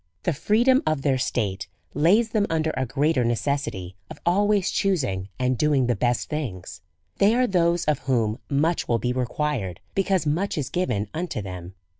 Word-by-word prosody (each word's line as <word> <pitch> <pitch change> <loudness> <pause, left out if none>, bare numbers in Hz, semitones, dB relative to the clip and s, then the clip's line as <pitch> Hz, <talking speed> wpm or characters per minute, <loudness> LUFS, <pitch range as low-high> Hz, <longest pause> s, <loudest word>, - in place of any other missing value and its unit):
The 175 - +1
freedom 235 - +3
of 155 -3 0
their 135 -3 +2
state 100 -7 -2 0.3
lays 195 - +3
them 210 -2 +1
under 160 -1 0
a 130 -1 -1
great 145 +3 +1
er - - +3
necessity 115 -7 -2
of - - -9
always 200 +2 +2
choosing 115 - 0
and 125 -1 0
doing 145 -4 +3
the 120 -1 +1
best 120 +3 0
things. 100 - -5 0.4
They 210 +3 +5
are 250 +1 +3
those 175 -4 +1
of 150 -1 +1
whom 120 -3 0
much 155 +4 +1
will 120 - +2
be 125 +3 -1
required^ 125 - -2 0.2
be 195 - +1
cause 190 -4 +1
much 165 +7 0
is 135 -4 -2
given 110 - -1
unto 170 -6 -3
them. 90 -2 -7
145 Hz, 180 wpm, -24 LUFS, 120-175 Hz, 0.4 s, They